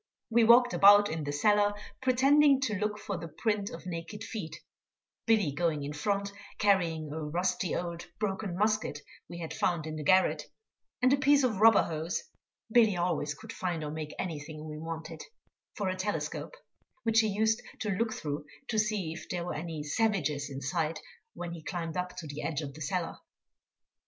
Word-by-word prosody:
We 235 0 +5
walked 245 +2 +6
about 205 -1 +7
in 160 -2 -3
the 145 - -2
cellar 205 +6 +3 0.3
pretending 275 +2 +5
to 245 -6 0
look 210 +1 -1
for 200 -2 -4
the 165 0 -6
print 205 +4 -1
of 245 - -9
naked 180 +4 -6
feet, 210 -8 -6 0.7
Billy 215 -9 +3
going 150 0 0
in 145 +1 -4
front 200 +6 -1 0.3
carrying 165 -7 +1
a 160 - -4
rusty 180 +3 -1
old 170 -1 -4
broken 200 -3 -2
musket 210 -8 0 0.3
we 175 - -7
had 165 -2 -5
found 170 -4 0
in 155 0 -5
the 150 - -4
garret, 185 +5 +3 0.6
and 255 +2 +6
a - - +4
piece 280 +1 +4
of 220 -6 +1
rubber 225 0 +7
hose 165 +1 -3 0.5
(Billy 220 -5 +5
always 155 -4 -1
could - - -10
find 175 -4 -2
or 150 - -4
make 155 -1 -6
anything 155 -3 -5
we 150 0 -6
wanted) 165 0 -6 0.5
for 205 - -2
a 185 - 0
telescope, 205 - -3 0.5
which 225 -1 +4
he 220 - +4
used 220 +2 +1 0.2
to 215 - -1
look 220 +4 0
through 150 -7 -4 0.2
to 220 - +1
see 210 -6 0
if 170 - -10
there 175 -1 -2
were 175 - -3
any 160 -1 -5
savages 150 -5 0
in 135 0 -6
sight 155 +4 -1 0.4
when 175 0 -5
he 170 -1 -7
climbed 165 0 -4
up 180 0 -3
to 165 - -6
the 145 0 -6
edge 160 -2 -2
of 140 -2 -6
the 155 - -11
cellar. 170 +3 -2
180 Hz, 185 wpm, -30 LUFS, 155-215 Hz, 0.7 s, about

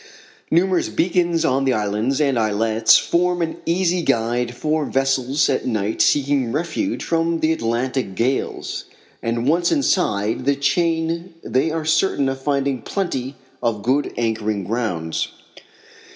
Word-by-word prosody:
Numerous 180 +2 +2
beacons 175 -1 +1
on 135 +1 +2
the 135 -1 +2
islands 105 +5 0
and 140 -5 +2
islets 110 +1 +4
form 180 +1 +1
an 160 - -4
easy 175 +1 +1
guide 120 -2 0
for 155 +4 0
vessels 135 0 +1
at - - -1
night 110 -2 -1
seeking 140 -4 +2
refuge 175 - -2
from 165 0 0
the 155 - +3
Atlantic 120 -4 -2
gales, 125 +6 -2 0.4
and 115 +2 -1
once 170 +3 +2
inside 110 - +1
the 140 - +3
chain 165 +4 0
they 135 +5 +1
are 160 0 -3
certain 160 -3 +2
of 135 0 -5
finding 140 -2 0
plenty 135 - -3 0.3
of 115 -4 -1
good 135 +4 +1
anchoring 110 -3 -1
grounds. 90 -7 -2
135 Hz, 135 wpm, -21 LUFS, 115-165 Hz, 0.4 s, islets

